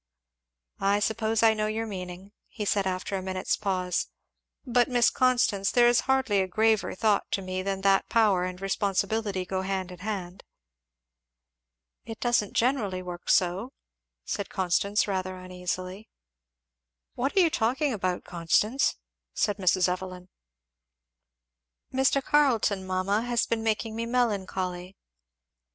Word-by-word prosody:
"I 200 +1 +2
suppose 220 +1 0
I 225 -1 +6
know 215 0 -1
your 220 +1 -2
meaning," 185 -1 -7 0.2
he 210 - -6
said 200 -1 +1
after 185 +1 -3
a 190 - -2
minute's 185 0 -1
pause; 185 -3 -1 0.6
"but, 245 -1 +2
Miss 245 -2 +4
Constance, 240 -6 +2
there 240 -1 +5
is 240 0 +4
hardly 260 -7 +3
a 190 - -1
graver 220 +2 +1
thought 210 0 +1
to 195 - 0
me 185 0 -3
than 195 0 -3
that 195 0 +3
power 210 -5 +3
and 180 0 -4
responsibility 195 0 -1
go 190 0 -2
hand 190 -1 -3
in 180 - -10
hand." 190 -2 -5 1.6
"It 225 -1 -8
don't 235 -4 +1
generally 220 -7 0
work 175 -1 -7
so," 190 +8 +2 0.5
said 200 - -3
Constance 195 +3 +1
rather 185 -1 -2
uneasily. 185 +2 -5 1.0
"What 270 +9 -2
are - - +8
you 335 -3 +3
talking 260 +4 0
about, 185 -4 -2
Constance?" 190 +9 +1 0.4
said 205 -2 0
Mrs. 185 -1 +3
Evelyn. 180 0 -5 1.6
"Mr. 265 +1 +2
Carleton, 230 -11 +2
mamma, 185 +3 0
has 240 0 0
been 230 -1 -1
making 220 0 -1
me 230 +1 -3
melancholy." 190 -6 -2
200 Hz, 135 wpm, -27 LUFS, 185-225 Hz, 1.6 s, are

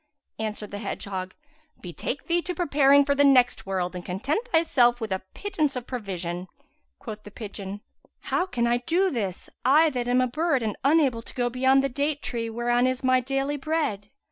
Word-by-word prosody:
Answered 215 -1 -4
the 205 - -5
hedgehog, 190 -2 -5 0.4
"Betake 180 - -5
thee 345 +1 +1
to 360 +1 -5
preparing 285 -4 +4
for 280 - +2
the 285 0 +3
next 255 -6 +4
world 185 -1 -2
and 180 - -5
content 275 - -2
thyself 250 -7 +3
with 220 -3 -4
a 190 - -1
pittance 310 -9 -1
of 250 -2 -4
provision." 185 -7 -4 0.5
Quoth 215 0 -8
the 210 - -11
pigeon, 205 -2 -7 0.4
"How 365 - 0
can 240 -10 -1
I 240 0 +3
do 355 +9 +1
this, 200 -8 -3 0.2
I 300 +5 +5
that 245 -2 -3
am 250 +1 +3
a 255 - +4
bird 285 0 0
and 215 -2 -2
unable 275 -5 +3
to - - -14
go 245 -1 0
beyond 265 +2 +3
the - - +2
date 285 +3 -2
tree 230 -1 -3
whereon 240 +2 +1
is 255 0 -2
my 255 0 +4
daily 270 +3 -1
bread? 280 -9 -2
250 Hz, 190 wpm, -26 LUFS, 210-285 Hz, 0.5 s, I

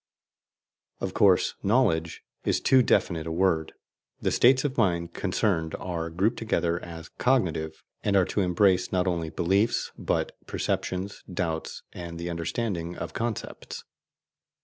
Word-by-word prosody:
Of - - -3
course, - - +4
"knowledge" 90 -8 +1 0.2
is - - +1
too 130 -1 +5
definite 85 -8 +1
a - - -3
word: 80 -2 +1 0.5
the - - 0
states 130 +2 +5
of 135 -2 -1
mind 85 -7 +1
concerned 80 -6 0
are 85 -2 -3
grouped 95 +8 +1
together 85 -6 0
as 80 -2 -8
"cognitive," 85 -11 +1 0.2
and 100 - +1
are 95 -2 +5
to 100 - -1
embrace 90 0 +3
not 90 0 +1
only 85 -3 -1
beliefs, 100 +8 +1
but - - 0 0.2
perceptions, 95 +2 -2
doubts, 80 -3 -3
and 85 -1 -7
the 85 +1 -4
understanding 85 0 -2
of 85 0 -5
concepts. 115 -2 -4
90 Hz, 135 wpm, -27 LUFS, 85-105 Hz, 0.5 s, too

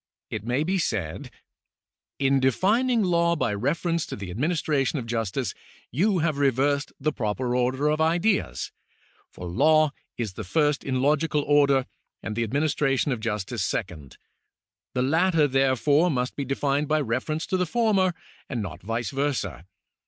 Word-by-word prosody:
It 105 -2 -4
may 125 +5 0
be 185 +4 0
said: 95 - -2 0.9
"In 135 0 +2
defining 215 - +2
law 170 -2 +2
by 150 - 0
reference 165 - 0
to - - -5
the 100 -3 -7
administration 150 - 0
of 125 - -4
justice, 115 -4 -2 0.4
you 190 - +2
have 155 -4 0
reversed 140 +1 +1
the 155 +2 0
proper 120 +1 -2
order 130 +3 +1
of 155 +1 +1
ideas, 175 +6 +1 0.6
for 90 - -9
law 155 - +4 0.3
is 110 -5 -3
the 110 - -6
first 145 - +1
in 130 -1 -1
logical 150 +1 +2
order, 140 -3 +3 0.4
and 110 - -4
the 115 - -1
administration 140 +2 +1
of 125 - -1
jus 105 -3 -2
tice 120 -1 -4
second. 90 -7 -4 0.8
The 125 - +2
latter, 160 +2 +3
therefore, 135 +5 +3
must 125 -4 -1
be 140 - -3
defined 140 +2 0
bj^ 155 -1 +2
refer 130 +7 -1
ence 155 - -3
to 190 - -1
the 180 -1 0
former, 200 -5 +2 0.3
and 125 - -2
not 85 -6 -7
vice 115 +4 -3
versa. 135 - -2
140 Hz, 160 wpm, -25 LUFS, 120-155 Hz, 0.9 s, law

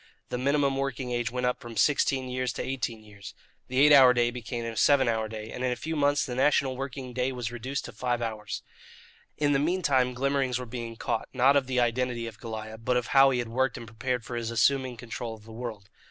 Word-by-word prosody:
The - - -2
minimum 140 0 +2
working 135 -2 -3
age 120 -1 0
went 125 +1 -2
up 125 - 0
from 115 -2 -9
sixteen 135 -1 +2
years 125 0 -2
to - - -4
eighteen 120 -4 -3
years. 100 -2 -11 0.3
The 130 - -4
eight 150 +1 +7
hour 130 -3 +8
day 120 0 +2
became 120 -1 -5
a 115 -1 -4
seven 135 +2 +4
hour 110 -1 0
day, 110 0 -7
and 125 - -5
in 130 - +1
a - - 0
few 160 +5 -4
months 145 -1 +2
the 125 - -5
national 135 0 +2
working 130 -1 -6
day 130 +1 0
was 120 -3 -4
reduced 130 +4 -4
to - - -7
five 125 -1 -1
hours. 110 -3 -4 0.7
In 145 -1 +2
the 140 - +3
meantime 140 -6 +1
glimmerings 135 -1 0
were 125 - -5
being 115 -1 -6
caught, 110 - -3
not 130 +2 +4
of 135 -3 +2
the 130 -1 0
identity 120 0 0
of 115 -2 -8
Goliah, 110 -1 -7
but 125 +1 +2
of 125 - -2
how 135 0 +7
he 130 - 0
had 120 -2 -2
worked 130 +2 0
and - - -8
prepared 115 +2 -3
for 120 - -6
his 115 -1 -3
assuming 125 +2 +2
control 115 0 -6
of 110 - -17
the 110 - -13
world. 110 -3 -7
125 Hz, 235 wpm, -28 LUFS, 115-135 Hz, 0.7 s, hour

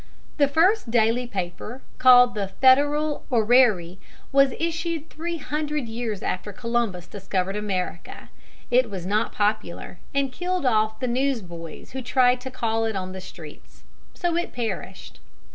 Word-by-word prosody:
] - - -31
The 285 - +5
first 335 - +2
daily 235 +2 +2
paper, 200 +4 -5 0.2
called 250 -1 +7
The 205 -3 -2
Federal 290 +8 +3
Orrery, 220 -7 +3 0.3
was 275 -1 +4
issued 330 -1 -3
three 335 +2 -4
hundred 300 -3 -3
years 225 -3 -4
after 195 +3 -3
Columbus 230 -5 -2
discovered 195 -1 -3
America. 195 -4 -4 0.4
It 250 -1 +4
was 190 -4 -6
not 210 +4 0
popular, 205 -4 -2
and 275 -1 0
killed 360 -1 -2
off 220 -2 +2
the 255 - -2
news 255 -1 0
boys 170 -2 -10
who 265 - -5
tried 250 0 +3
to 260 - -6
call 225 -3 -1
it 220 -2 -2
on 185 -1 -4
the 190 0 -7
streets: 160 -5 -13 0.3
so 345 -1 -1
it 345 +1 -2
perished. 195 -5 -5
240 Hz, 150 wpm, -24 LUFS, 200-275 Hz, 0.4 s, called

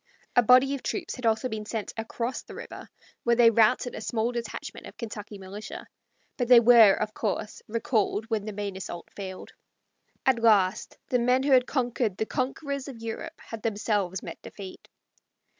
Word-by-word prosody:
A 245 - +7
body 255 +4 +5
of 275 - -4
troops 345 -4 -3
had 250 -2 -2
also 225 +3 +2
been 215 -3 -5
sent 220 -2 -4
across 230 +2 -3
the - - -12
river, - - -9 0.3
where 235 0 +3
they 230 -1 +6
routed 230 +3 +3
a - - -6
small 225 +1 -1
detachment 235 -2 -6
of - - -13
Kentucky 210 -2 -7
militia; 195 +3 -8 0.5
but 245 - 0
they 245 -1 +9
were, 230 -3 +8
of 215 0 -3
course, 210 0 -3
recalled 220 -1 0
when 220 -3 -2
the 215 - -4
main 200 -1 -4
assault 175 -2 -7
failed. 190 -2 -7 0.7
At 255 -3 +3
last 210 -3 +3
the 250 - +2
men 250 +2 +2
who 280 - +1
had 255 -1 +5
conquered 240 -6 -1
the 220 - -1
conquerors 275 +3 -3
of 265 -4 -8
Europe 230 +9 -6
had 225 -1 -8
themselves 205 -4 -1
met - - -8
defeat. 195 -2 -10
225 Hz, 175 wpm, -27 LUFS, 210-250 Hz, 0.7 s, they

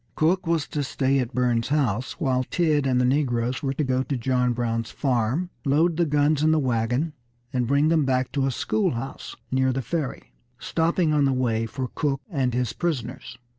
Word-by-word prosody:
Cook 170 +3 +1
was 165 -3 +1
to 150 - -2
stay 135 0 +1
at 125 -1 -2
Burns's 120 -2 +1
house 130 -5 0
while 130 -6 0
Tidd 150 -1 +1
and 125 -1 +2
the 125 - +3
negroes 125 -2 0
were 135 -1 -1
to 150 - 0
go 130 -1 +1
to 135 0 -2
John 125 0 +1
Brown's 115 -1 -2
farm, 130 +6 0
load 160 +4 +2
the 170 -1 +2
guns 145 0 +2
in 155 - +3
the 160 - +3
wagon, 125 +3 0 0.4
and 125 -2 0
bring 140 +4 +3
them 160 -2 +3
back 130 -1 0
to 135 -2 0
a - - 0
schoolhouse 135 - -2 0.2
near 130 0 +2
the 130 +1 -2
Ferry, 145 +2 -4 0.2
stopping 165 +2 +1
on 145 -2 +3
the 135 - +2
way 115 -3 0
for 130 +2 -4
Cook 140 -3 0
and 135 -6 0
his 125 -3 -1
prisoners. 135 -7 -4
135 Hz, 195 wpm, -25 LUFS, 125-150 Hz, 0.4 s, the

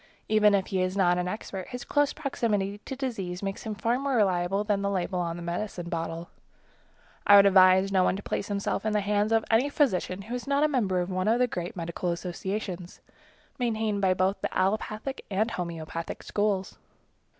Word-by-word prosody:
Even 210 -1 +5
if 190 -1 +1
he 185 - +2
is 185 +1 -1
not 180 -2 +3
an 180 - -1
expert, 190 -1 -5
his 250 -1 -6
close 290 -1 +2
proximity 210 -8 -1
to 265 - -5
disease 200 -9 -4
makes 195 0 -3
him 215 - -3
far 235 +4 0
more 275 -1 -1
reliable 195 -2 +2
than 205 -2 0
the 200 - 0
label 185 -1 -1
on 170 -1 -2
the 175 - -7
medicine 175 0 -4
bottle. 165 0 -4 1.0
I 205 - +9
would 200 0 +8
advise 190 0 +6
no 190 -1 +4
one 180 - +2
to 200 - -7
place 200 - -3
himself 200 -1 -2
in 215 -1 0
the 210 - +2
hands 205 +1 +1
of 225 -1 +3
any 240 +6 +4
physician 200 - 0
who 225 +4 -7
is 250 +2 -4
not 280 +1 +2
a - - +5
member 205 -11 +1
of 175 +2 -4
one 185 +2 -1
of 225 +2 +4
the 250 - +4
great 175 -7 -5
medical 170 +1 -3
associations, 180 +1 -5 0.6
maintained 220 -4 0
by 185 -1 +3
both 190 +1 0
the - - -2
allopathic 215 +6 -1
and 215 +3 0
homeopathic 165 -4 -5
schools. 205 -2 -1
200 Hz, 200 wpm, -27 LUFS, 185-220 Hz, 1.0 s, I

